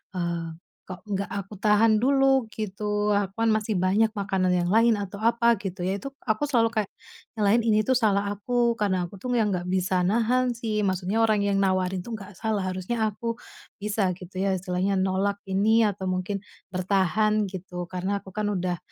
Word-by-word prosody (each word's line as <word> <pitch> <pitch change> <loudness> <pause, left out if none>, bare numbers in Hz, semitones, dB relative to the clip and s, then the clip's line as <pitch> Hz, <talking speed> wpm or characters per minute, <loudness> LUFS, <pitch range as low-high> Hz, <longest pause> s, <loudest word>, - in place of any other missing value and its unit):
eee, 170 -2 -2 0.4
kok 185 0 -8
nggak 200 0 -1
aku 200 +1 -6
tahan 215 +2 +4
dulu 270 +1 +3
gitu, 210 0 -2
aku 200 -2 +1
kan 225 - +3
masih 215 0 +1
banyak 200 +4 +2
makanan 195 -3 0
yang 175 -1 +1
lain 230 +3 +5
atau 200 0 -6
apa 235 +1 +3
gitu 190 -2 -6
ya, 190 +2 -1
itu 275 +6 -8
aku 220 +4 0
selalu 240 -5 +2
kayak 210 -2 0 0.4
nyalahin 220 +1 +2
ini 215 -1 +4
tuh 260 +4 +2
salah 205 -4 +1
aku, 235 +3 0
karena 185 -4 0
aku 200 - -12
tuh 250 +6 -3
yang 225 -3 +2
enggak 180 -3 -2
bisa 185 0 0
nahan 240 +5 +2
sih, 220 -3 -2
maksudnya 190 +4 +1
orang 215 -2 +2
yang 200 -1 +1
nawarin 185 -1 0
tuh 235 - -6
nggak 205 -3 -8
salah, 220 -1 -1
harusnya 185 +5 -3
aku 230 +3 -4 0.5
bisa 205 -3 0
gitu 185 +1 -11
ya 195 +1 +1
istilahnya 185 +1 -1
nolak 195 +2 0
ini 215 +4 +3
atau 195 -1 -5
mungkin 185 +2 -2 0.3
bertahan 195 +3 +1
gitu 180 -2 -7
karena 190 +2 -2
aku - - -12
kan 210 +3 -3
udah 180 -2 -1
200 Hz, 185 wpm, -26 LUFS, 185-220 Hz, 0.5 s, lain